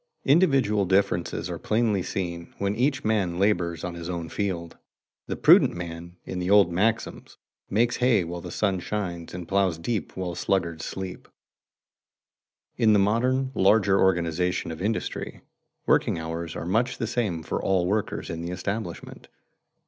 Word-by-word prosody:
Individual 135 Hz, -, +4 dB
differences 95 Hz, -2 st, 0 dB
are -, -, -5 dB
plainly 110 Hz, -3 st, +1 dB
seen 85 Hz, -2 st, -5 dB
when 100 Hz, 0 st, 0 dB
each 135 Hz, +4 st, +1 dB
man 100 Hz, -6 st, 0 dB
labors 85 Hz, -4 st, +1 dB
on 90 Hz, -, -3 dB
his 85 Hz, 0 st, -7 dB
own 85 Hz, -2 st, -4 dB
field. 85 Hz, -3 st, -3 dB, 0.5 s
The -, -, -2 dB
prudent -, -, +6 dB
man, 85 Hz, 0 st, -7 dB
in 90 Hz, -, -4 dB
the 90 Hz, +1 st, -2 dB
old 100 Hz, -3 st, +6 dB
maxims, 110 Hz, +6 st, -1 dB, 0.3 s
makes 120 Hz, +4 st, +2 dB
hay 125 Hz, -6 st, +3 dB
while 85 Hz, +1 st, -6 dB
the -, -, -7 dB
sun 95 Hz, -3 st, 0 dB
shines 90 Hz, -4 st, -4 dB
and 90 Hz, -2 st, -7 dB
ploughs 95 Hz, -4 st, +1 dB
deep 105 Hz, +4 st, -3 dB
while 90 Hz, -2 st, -3 dB
sluggards 85 Hz, -3 st, -1 dB
sleep. 95 Hz, -1 st, -6 dB, 1.5 s
In 110 Hz, -3 st, +4 dB
the -, -, +5 dB
modern 125 Hz, +6 st, +1 dB
larger 100 Hz, -1 st, +4 dB
organization 90 Hz, -1 st, +1 dB
of 80 Hz, -, -7 dB
industry, 110 Hz, +3 st, -3 dB, 0.4 s
working -, -, +2 dB
hours 80 Hz, 0 st, -5 dB
are -, -, -5 dB
much 115 Hz, +8 st, 0 dB
the 115 Hz, -, -2 dB
same 105 Hz, -8 st, -2 dB
for -, -, -3 dB
all 95 Hz, -2 st, +1 dB
workers 105 Hz, +3 st, -2 dB
in 85 Hz, 0 st, -5 dB
the 85 Hz, -, -4 dB
establishment. 90 Hz, 0 st, -5 dB
95 Hz, 155 wpm, -26 LUFS, 85-110 Hz, 1.5 s, prudent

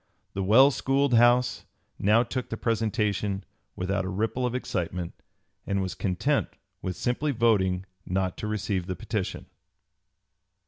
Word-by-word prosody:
The 100 Hz, -, -2 dB
well 120 Hz, +9 st, +6 dB
schooled 135 Hz, 0 st, +1 dB
House 120 Hz, +1 st, +4 dB, 0.3 s
now 105 Hz, +4 st, +4 dB
took 125 Hz, +1 st, -4 dB
the 115 Hz, -, -4 dB
presentation 105 Hz, -3 st, 0 dB, 0.3 s
without 95 Hz, +1 st, -1 dB
a 95 Hz, -, -3 dB
ripple 110 Hz, +6 st, -1 dB
of 125 Hz, -, -3 dB
excitement, 90 Hz, -7 st, -3 dB, 0.5 s
and 100 Hz, 0 st, 0 dB
was 95 Hz, -2 st, -2 dB
content 90 Hz, -3 st, 0 dB, 0.3 s
with 90 Hz, -1 st, -3 dB
simply 135 Hz, -, 0 dB
voting 100 Hz, -7 st, +2 dB, 0.2 s
not 95 Hz, 0 st, -1 dB
to 105 Hz, -, -4 dB
receive 100 Hz, -4 st, -2 dB
the 95 Hz, -, -2 dB
petition. -, -, -3 dB
105 Hz, 135 wpm, -27 LUFS, 95-120 Hz, 0.5 s, well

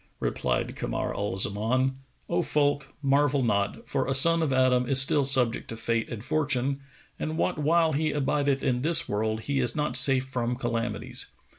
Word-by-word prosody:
Replied 60 Hz, -1 st, -2 dB
Kamar -, -, -3 dB
al 100 Hz, -2 st, -3 dB
Zaman, 115 Hz, +7 st, 0 dB, 0.3 s
"O 175 Hz, +1 st, 0 dB
folk, 145 Hz, -3 st, 0 dB
marvel 140 Hz, 0 st, +2 dB
not, 100 Hz, -3 st, -1 dB
for 135 Hz, -2 st, -1 dB
a 135 Hz, -, +1 dB
son 165 Hz, +5 st, +5 dB
of 155 Hz, -4 st, 0 dB
Adam 130 Hz, -1 st, +2 dB
is 135 Hz, -1 st, +6 dB
still 140 Hz, +2 st, +4 dB
subject 130 Hz, -4 st, +1 dB
to 115 Hz, -, -7 dB
Fate 115 Hz, 0 st, -2 dB
and 115 Hz, -2 st, -7 dB
Fortune, 140 Hz, -2 st, -1 dB, 0.4 s
and 155 Hz, +1 st, -4 dB
what 155 Hz, -, -1 dB
while 160 Hz, +2 st, +2 dB
he 155 Hz, +2 st, 0 dB
abideth 140 Hz, -1 st, 0 dB
in 125 Hz, -2 st, 0 dB
this 165 Hz, +4 st, +2 dB
world, 110 Hz, +1 st, -2 dB
he 140 Hz, +4 st, -2 dB
is 125 Hz, -2 st, +1 dB
not 150 Hz, 0 st, -2 dB
safe 130 Hz, -1 st, +4 dB
from 125 Hz, -2 st, -3 dB
calamities. 120 Hz, -2 st, -3 dB
135 Hz, 175 wpm, -26 LUFS, 120-145 Hz, 0.4 s, is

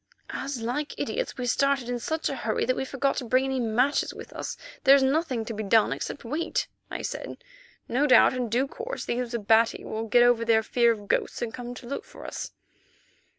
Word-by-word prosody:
"As, 275 Hz, -2 st, -4 dB
like 250 Hz, +6 st, -3 dB
idiots, -, -, -3 dB
we 250 Hz, -, -3 dB
started 275 Hz, +1 st, +1 dB
in 245 Hz, 0 st, -2 dB
such 320 Hz, +6 st, -2 dB
a 275 Hz, -, -2 dB
hurry 220 Hz, -, -1 dB
that 255 Hz, -, +1 dB
we 265 Hz, -, -2 dB
forgot 275 Hz, +1 st, 0 dB
to -, -, -2 dB
bring 255 Hz, +3 st, +2 dB
any 265 Hz, -1 st, -1 dB
matches 245 Hz, +5 st, +1 dB
with -, -, -10 dB
us, -, -, -5 dB, 0.3 s
there 270 Hz, +1 st, +8 dB
is 275 Hz, -, +4 dB
nothing 265 Hz, -4 st, +1 dB
to 230 Hz, -, -5 dB
be 215 Hz, -, -4 dB
done, 215 Hz, +1 st, +3 dB
except -, -, -6 dB
wait," 305 Hz, +8 st, -1 dB, 0.2 s
I -, -, -5 dB
said. -, -, -5 dB, 0.5 s
"No 270 Hz, +5 st, +2 dB
doubt 255 Hz, -, +7 dB
in 250 Hz, -2 st, -2 dB
due 250 Hz, +5 st, +1 dB
course -, -, -6 dB
those 240 Hz, 0 st, -2 dB
Abati 225 Hz, +1 st, +3 dB
will 220 Hz, +1 st, -4 dB
get 240 Hz, +2 st, +5 dB
over 240 Hz, -1 st, +4 dB
their 225 Hz, -1 st, +3 dB
fear 235 Hz, +1 st, +3 dB
of 205 Hz, -3 st, -5 dB
ghosts 200 Hz, -, 0 dB
and 225 Hz, -1 st, -4 dB
come 245 Hz, 0 st, -6 dB
to 245 Hz, -, -10 dB
look 280 Hz, -, -4 dB
for -, -, -13 dB
us." -, -, -5 dB
245 Hz, 215 wpm, -27 LUFS, 230-275 Hz, 0.5 s, there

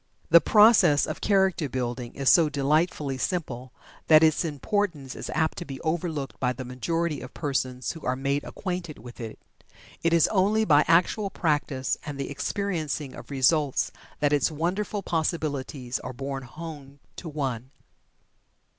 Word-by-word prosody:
The 170 Hz, 0 st, +9 dB
process 210 Hz, -7 st, +6 dB
of -, -, -6 dB
Character 190 Hz, -7 st, +2 dB
building 120 Hz, -1 st, -4 dB
is 140 Hz, -1 st, -3 dB
so 165 Hz, 0 st, +6 dB
delightfully 145 Hz, -1 st, 0 dB
simple 130 Hz, -9 st, -3 dB, 0.4 s
that 155 Hz, 0 st, +7 dB
its 155 Hz, +1 st, +3 dB
importance 155 Hz, -2 st, -2 dB
is -, -, -6 dB
apt 160 Hz, -1 st, 0 dB
to -, -, -4 dB
be 135 Hz, -3 st, -7 dB
overlooked 160 Hz, -4 st, -3 dB
by 125 Hz, -1 st, +1 dB
the 130 Hz, 0 st, -7 dB
majority 160 Hz, +5 st, -2 dB
of 130 Hz, -, -10 dB
persons 130 Hz, -4 st, -2 dB
who 165 Hz, -, -10 dB
are 125 Hz, -, 0 dB
made 140 Hz, +2 st, -1 dB
acquainted 180 Hz, -5 st, -5 dB
with 120 Hz, +3 st, -12 dB
it. 115 Hz, -2 st, -6 dB, 0.6 s
It 165 Hz, -, +2 dB
is 165 Hz, -2 st, +5 dB
only 210 Hz, +2 st, +2 dB
by 150 Hz, -4 st, +5 dB
actual 180 Hz, +5 st, +3 dB
practice 145 Hz, -7 st, -1 dB
and 145 Hz, -2 st, -6 dB
the 140 Hz, -, -3 dB
experiencing 155 Hz, -4 st, -3 dB
of -, -, -11 dB
results 140 Hz, +1 st, +2 dB, 0.3 s
that 145 Hz, 0 st, +3 dB
its 145 Hz, -, +3 dB
wonderful 185 Hz, +6 st, -2 dB
possibilities 145 Hz, -7 st, -2 dB
are 130 Hz, -, -7 dB
borne 135 Hz, +2 st, -4 dB
home 145 Hz, -1 st, -9 dB, 0.2 s
to 170 Hz, -, -6 dB
one. 130 Hz, -5 st, -3 dB
150 Hz, 155 wpm, -26 LUFS, 135-170 Hz, 0.6 s, The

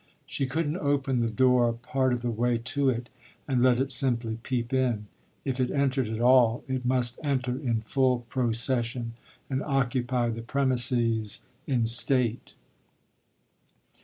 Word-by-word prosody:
She 135 Hz, -, -2 dB
couldn't 155 Hz, +4 st, -2 dB
open 140 Hz, -4 st, 0 dB
the 115 Hz, -1 st, 0 dB
door 125 Hz, +1 st, +3 dB
a -, -, -1 dB
part 130 Hz, +2 st, -1 dB
of 125 Hz, -1 st, -2 dB
the 120 Hz, -, -1 dB
way 120 Hz, +1 st, 0 dB
to 135 Hz, +4 st, 0 dB
it 120 Hz, -1 st, -2 dB, 0.4 s
and 130 Hz, -3 st, +1 dB
let 125 Hz, -1 st, +4 dB
it 135 Hz, +2 st, -1 dB
simply 115 Hz, -4 st, +1 dB
peep 120 Hz, 0 st, -3 dB
in; 125 Hz, -5 st, 0 dB, 0.4 s
if 135 Hz, -1 st, -2 dB
it 125 Hz, -1 st, +1 dB
entered 135 Hz, -3 st, 0 dB
at 110 Hz, 0 st, -4 dB
all 120 Hz, -1 st, +4 dB
it 130 Hz, -1 st, -3 dB
must 125 Hz, -1 st, 0 dB
enter 130 Hz, -4 st, -1 dB
in 120 Hz, -5 st, -2 dB
full 125 Hz, +2 st, +1 dB
procession 120 Hz, -1 st, -1 dB, 0.3 s
and 135 Hz, 0 st, -2 dB
occupy 125 Hz, -3 st, 0 dB
the 115 Hz, 0 st, -5 dB
premises 120 Hz, -4 st, 0 dB, 0.2 s
in 125 Hz, -4 st, +1 dB
state. 120 Hz, 0 st, +2 dB
125 Hz, 150 wpm, -27 LUFS, 115-130 Hz, 0.4 s, let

